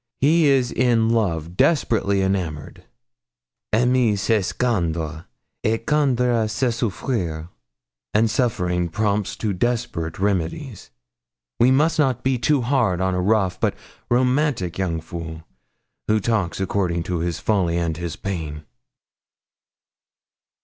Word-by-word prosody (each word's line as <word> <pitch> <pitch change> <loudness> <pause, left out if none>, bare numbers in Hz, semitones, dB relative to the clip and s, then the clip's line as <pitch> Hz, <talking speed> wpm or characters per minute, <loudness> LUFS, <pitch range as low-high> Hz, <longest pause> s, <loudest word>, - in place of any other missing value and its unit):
He 155 +3 +4
is 130 -3 +3
in 115 -3 +2
love 85 -7 0
desperately 105 - +2
enamoured. 90 -7 -3 0.9
Aimer 120 -1 +3
c'est 105 0 0
craindre, 85 -9 -1 0.4
et 115 +1 0
craindre 125 -6 +2
c'est 120 +3 0
souffrir. 95 -8 -3 0.6
And 110 +2 +3
suffering 90 -8 0
prompts 105 +1 -1
to 105 -3 -2
desperate 95 -6 -2
remedies. 100 - -2 0.7
We 120 - +5
must 150 +4 +3
not 130 -5 +1
be 130 -2 +1
too 140 +3 +2
hard 115 -8 +1
on 95 0 0
a 90 - 0
rough 95 -2 +1
but - - 0 0.3
romantic 125 - +1
young 85 -4 -1
fool, 80 -1 -7 0.6
who 110 0 +3
talks 100 -5 -1
according 90 -3 -1
to 90 0 -2
his 85 0 -2
folly 90 -6 +1
and 85 -2 -1
his 85 0 -5
pain.' 80 -6 -5
105 Hz, 120 wpm, -22 LUFS, 85-120 Hz, 0.9 s, We